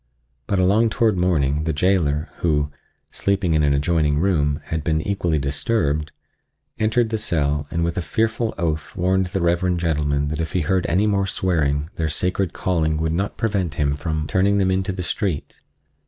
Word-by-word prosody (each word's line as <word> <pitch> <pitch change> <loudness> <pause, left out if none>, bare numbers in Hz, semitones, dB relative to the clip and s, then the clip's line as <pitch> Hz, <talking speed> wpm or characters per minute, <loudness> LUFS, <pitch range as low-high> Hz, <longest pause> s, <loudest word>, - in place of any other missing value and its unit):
But 100 - 0
along 100 +5 +3
toward 110 -1 +2
morning 75 -5 +1
the 80 - 0
jailer, 80 -2 +1
who, 75 -3 0 0.4
sleeping 95 -4 0
in 80 - +3
an 70 -1 +3
adjoining 75 0 +1
room, 75 -4 +1
had 80 -2 -3
been 80 -1 +1
equally 85 -2 -1
disturbed, 75 +2 -1 0.7
entered 110 +2 +2
the 110 - 0
cell 75 -6 0
and 85 +1 -1
with 85 +1 -1
a - - -1
fearful 110 +5 -1
oath 80 -3 -2
warned 95 +1 +1
the 95 0 -2
reverend 85 +1 +1
gentlemen 75 -3 0
that 75 +2 -2
if 80 - -4
he 90 - +1
heard 90 +3 0
any 95 +6 +2
more 100 -2 +1
swearing 80 -5 0
their 80 -1 0
sacred 90 +4 -1
calling 80 -5 0
would 80 +1 -1
not 95 +4 -2
prevent 100 -9 -1
him 70 -1 +1
from 75 +1 -2
turning 95 +6 +2
them 95 -1 +2
into 95 +1 0
the 95 -1 -4
street. 90 -5 -3
85 Hz, 180 wpm, -22 LUFS, 75-95 Hz, 0.7 s, along